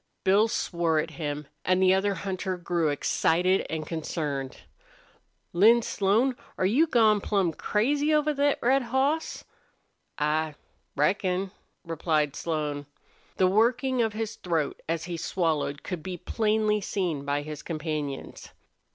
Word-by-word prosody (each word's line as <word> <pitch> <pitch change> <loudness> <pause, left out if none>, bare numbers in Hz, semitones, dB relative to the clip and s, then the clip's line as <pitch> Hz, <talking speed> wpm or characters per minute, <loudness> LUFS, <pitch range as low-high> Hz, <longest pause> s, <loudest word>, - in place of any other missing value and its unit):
Bill 200 +4 +4
swore 170 -7 0
at 155 - -1
him, 150 -2 -4 0.2
and 185 0 +2
the 185 0 +5
other 195 +1 +1
hunter 190 -1 -3
grew 170 -2 0
excited 175 +5 +1
and 160 -1 -3
concerned. 150 -4 -4 0.9
"Lin 225 +6 +6
Slone, 220 +6 +1 0.2
are 185 - +1
you 265 - +4
gone 220 -6 +4
plumb 195 -6 +1
crazy 285 - +1
over 300 0 +3
thet 285 0 +2
red 265 +3 +4
hoss?" 265 +6 -1 0.7
"I 155 +1 0 0.4
reckon," 185 +5 +1 0.3
replied 155 -3 0
Slone. 150 -3 -3 0.5
The 185 - +4
working 240 +6 +2
of 220 -2 0
his 220 0 -4
throat 165 -5 -2
as 165 -1 -1
he 170 -1 -4
swallowed 160 -4 -1
could 180 -4 -4
be 180 +2 -5
plainly 215 +2 +1
seen 175 -8 -2
by 145 +1 -1
his 150 0 -7
companions. 155 -4 -5
185 Hz, 135 wpm, -27 LUFS, 155-220 Hz, 0.9 s, Lin